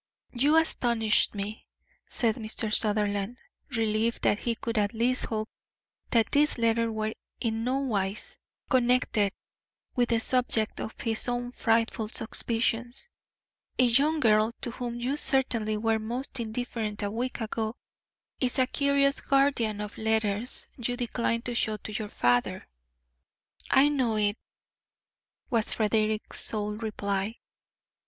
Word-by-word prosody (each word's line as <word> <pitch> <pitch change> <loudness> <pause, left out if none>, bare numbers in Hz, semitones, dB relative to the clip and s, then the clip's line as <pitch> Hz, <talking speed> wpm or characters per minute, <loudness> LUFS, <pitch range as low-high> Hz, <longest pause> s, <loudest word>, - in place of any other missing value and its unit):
"You 285 +6 +3
astonish 235 -8 +3
me," 205 +2 -5 0.4
said 225 -3 +2
Mr. 220 -1 -3
Sutherland, 205 +1 +1 0.3
relieved 225 -2 0
that 205 - +3
he 235 -1 -1
could 230 -1 -2
at 205 +2 -1
least 245 +3 +1
hope 215 -1 -3 0.6
that 230 -2 +2
these 295 +1 +3
letters 230 0 +1
were 220 0 -2 0.3
in 225 -1 -2
nowise 230 -6 -2 0.3
connected 245 -5 +2 0.6
with 245 -2 +1
the 230 -1 +2
subject 230 -2 +1
of 220 - -6
his 225 0 -1
own 245 0 -2
frightful 225 -2 0
suspicions. 230 - -1 0.7
"A - - +4
young 280 +6 +3
girl, 215 -3 +3
to 240 - -2
whom 240 0 -5
you 260 +4 -1
certainly 235 -7 +5
were 225 +1 +1
most 245 +4 -3
indifferent 220 -2 -3
a 200 - -2
week 245 +4 -3
ago, 220 0 -3 0.6
is 255 0 +1
a 260 - +4
curious 280 +1 +2
guardian 270 -6 +1
of 210 +1 -7
letters 220 +1 -1
you 245 0 -2
decline 235 -1 -1
to 245 - -2
show 220 -2 -1
your 210 0 -4
father." 120 -6 0 1.0
"I 270 +2 +6
know 255 -6 0
it," 205 -1 +1 1.2
was 230 -2 +1
Frederick's 215 0 0
sole 210 -1 -1
reply. 210 -1 -3
230 Hz, 130 wpm, -28 LUFS, 215-245 Hz, 1.2 s, I